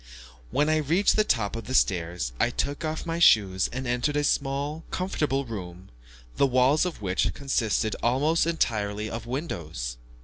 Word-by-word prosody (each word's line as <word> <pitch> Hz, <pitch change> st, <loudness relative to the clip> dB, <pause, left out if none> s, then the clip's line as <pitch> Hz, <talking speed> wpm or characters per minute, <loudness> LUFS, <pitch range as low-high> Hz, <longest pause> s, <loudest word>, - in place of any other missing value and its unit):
When 145 Hz, -, +1 dB
I 155 Hz, 0 st, +3 dB
reached 165 Hz, +7 st, +2 dB
the 215 Hz, -, +4 dB
top 115 Hz, -, 0 dB
of 115 Hz, -, -6 dB
the 130 Hz, -, -3 dB
stairs, 85 Hz, -, +1 dB
I 120 Hz, -, +3 dB
took 145 Hz, +5 st, -3 dB
off 155 Hz, 0 st, -3 dB
my 165 Hz, 0 st, -2 dB
shoes, 95 Hz, -, +4 dB
and 130 Hz, +2 st, -4 dB
entered 125 Hz, +5 st, 0 dB
a 145 Hz, -, +1 dB
small, 145 Hz, +3 st, -1 dB
comfortable 150 Hz, -7 st, -1 dB
room, 95 Hz, -5 st, -8 dB, 0.5 s
the 140 Hz, -, +4 dB
walls 130 Hz, +6 st, +3 dB
of 160 Hz, -11 st, -7 dB
which 95 Hz, 0 st, +1 dB
consisted 115 Hz, -5 st, 0 dB
almost 145 Hz, +8 st, +2 dB
entirely 110 Hz, -9 st, -1 dB
of 115 Hz, +1 st, -6 dB
windows. 80 Hz, -, -4 dB
130 Hz, 165 wpm, -26 LUFS, 105-150 Hz, 0.5 s, the